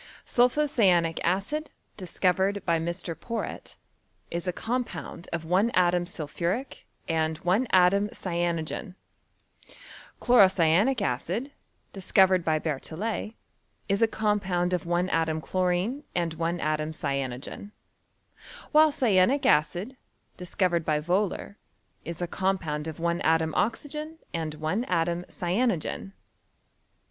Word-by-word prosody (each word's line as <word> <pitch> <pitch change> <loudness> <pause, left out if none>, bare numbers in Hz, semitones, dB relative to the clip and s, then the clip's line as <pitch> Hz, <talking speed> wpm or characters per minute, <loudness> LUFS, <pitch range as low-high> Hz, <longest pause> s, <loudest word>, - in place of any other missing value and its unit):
Sulpho 250 +5 +3
cyanic 180 - +2
acid, 200 - -1 0.3
discovered 190 +1 0
by 170 -2 +2
Mr. 170 +1 -4
Porrett, 225 +8 -6 0.6
is 170 +2 -3
a - - +2
compound 220 -6 -4
of 165 -1 -3
one 185 +7 +3
atom 175 -1 +3
sulphuric, 175 - -4 0.2
and 160 -1 0
one 200 +9 +2
atom 195 +3 +4
cyanogen; 175 +1 -3 1.2
chloro 240 -6 +6
cyanic 190 +9 +3
acid, 180 - -2 0.4
discovered 190 -1 +3
by 160 -1 +2
Berthollet, 165 +9 -3 0.5
is 200 0 0
a 225 - +6
compound 195 -5 0
of 175 -2 -1
one 175 +1 +1
atom 160 -2 +1
chlorine 185 - -1
and 170 -2 0
one 170 +2 -2
atom 155 0 -1
cyanogen; 140 +5 -4 1.0
while 310 0 +6
cyanic 245 +1 +3
acid, 175 - +2 0.4
dis 180 -2 -9
covered 175 -3 +2
by 155 -1 +1
Wohler, 190 +5 -1 0.5
is 170 +1 -5
a - - -1
compound 165 -5 -1
of 160 -1 -6
one 170 +1 0
atom 160 0 +2
oxygen 300 +8 -2 0.2
and 160 -2 -3
one 155 +9 -1
atom 170 -1 0
cyanogen. 195 0 -1
180 Hz, 115 wpm, -27 LUFS, 165-205 Hz, 1.2 s, chloro